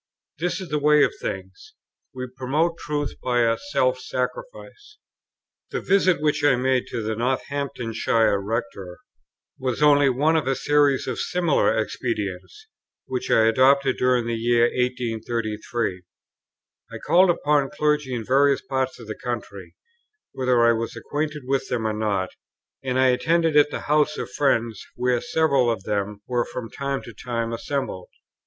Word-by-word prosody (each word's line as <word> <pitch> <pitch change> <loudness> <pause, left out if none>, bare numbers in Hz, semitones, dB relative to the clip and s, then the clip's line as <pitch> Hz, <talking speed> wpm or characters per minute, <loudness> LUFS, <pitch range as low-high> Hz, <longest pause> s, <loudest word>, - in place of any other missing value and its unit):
This 175 +1 -1
is 185 -3 -8
the 150 0 0
way 150 0 +5
of - - +1
things; 435 -3 -7 0.4
we 130 -2 -5
promote 150 +6 0
truth 145 -1 -3
by 125 -1 +1
a 115 -1 +2
self 130 -7 +1
sacrifice." 420 - -6 0.7
The - - -3
visit 185 -4 +2
which 150 0 0
I 145 -3 +5
made 130 0 0
to 115 - -4
the 110 +1 -2
Northamptonshire 120 -4 0
Rector 100 -4 -4 0.6
was 130 +2 -1
only 145 -2 +5
one 145 +6 +2
of 155 -4 0
a 135 - +1
series 145 0 +2
of - - -4
similar 170 -9 +1
expedients, 110 - -4 0.4
which 130 -1 -4
I 110 - +4
adopted 130 +3 +4
during 125 -2 +2
the 115 - -2
year 115 +1 +2
1833. 115 -4 -2 0.9
I - - -6
called 185 +2 +4
upon 145 -4 +2
clergy 150 -6 0
in 115 -2 -4
various 140 +2 +3
parts 130 -1 -2
of 115 - -10
the 110 - -5
country, 120 +1 -6 0.6
whether 125 -2 +2
I 115 - +6
was 115 0 -2
acquainted 150 0 -4
with 135 0 -1
them 115 -3 -1
or 110 - 0
not, 105 -4 -1 0.5
and 130 -1 -1
I 130 0 +4
attended 165 +5 +2
at 150 0 +6
the - - -5
houses 150 0 +1
of - - -5
friends 115 -7 0
where 125 -1 0
several 140 -6 +2
of 115 -5 -2
them 105 0 -3
were 120 -1 +1
from 120 -3 -7
time 140 -1 -3
to 115 - -10
time 115 +1 -3
assembled. 115 -6 -4
130 Hz, 155 wpm, -23 LUFS, 115-145 Hz, 0.9 s, I